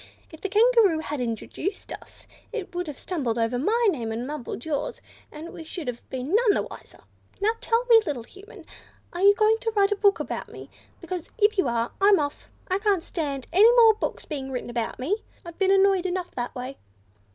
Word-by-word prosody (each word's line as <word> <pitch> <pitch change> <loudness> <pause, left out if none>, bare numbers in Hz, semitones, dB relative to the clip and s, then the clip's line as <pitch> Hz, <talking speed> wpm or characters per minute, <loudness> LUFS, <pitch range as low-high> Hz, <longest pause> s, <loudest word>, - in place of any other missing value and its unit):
"If 320 - -12
the 395 - -3
Kangaroo 435 -4 +4
had 295 -3 -4
introduced 245 - -4
us, - - -13 0.3
it 445 -6 -5
would 355 0 -3
have 295 - -6
stumbled 265 -11 -2
over 230 +2 0
my 455 - +2
name, 235 -9 -4
and 230 +2 -3
mumbled 275 -4 -6
yours, 320 - -3 0.3
and 315 +3 -9
we 325 - -8
should 320 -1 -7
have 240 -1 -4
been 260 +5 -4
none 440 -1 +4
the - - 0
wiser. - - -12 0.4
Now 415 +2 +3
tell 475 0 +1
me, 460 -2 +7
little 285 - -4
Human, 390 - -14 0.5
are 350 - -4
you 405 +1 +7
going 435 +2 +3
to 460 -2 -1
write 400 0 +3
a - - +3
book 405 0 +3
about - - -5
me? - - -11 0.3
Because, 350 -1 -5
if 425 0 +3
you 380 -9 +2
are, 235 0 -1
I'm 400 -1 +6
off. 285 -1 -4 0.2
I 375 +1 0
can't 400 -5 +1
stand 285 -8 -4
any 425 +6 +7
more 455 -2 +7
books 420 - -4
being 275 -4 -5
written 250 -1 -4
about 235 -1 -3
me; 310 +12 -1 0.3
I've 340 0 -10
been 385 -1 +3
annoyed 390 -1 +4
enough 365 -1 -3
that 245 +2 -5
way." 255 +2 -6
355 Hz, 210 wpm, -25 LUFS, 270-410 Hz, 0.5 s, me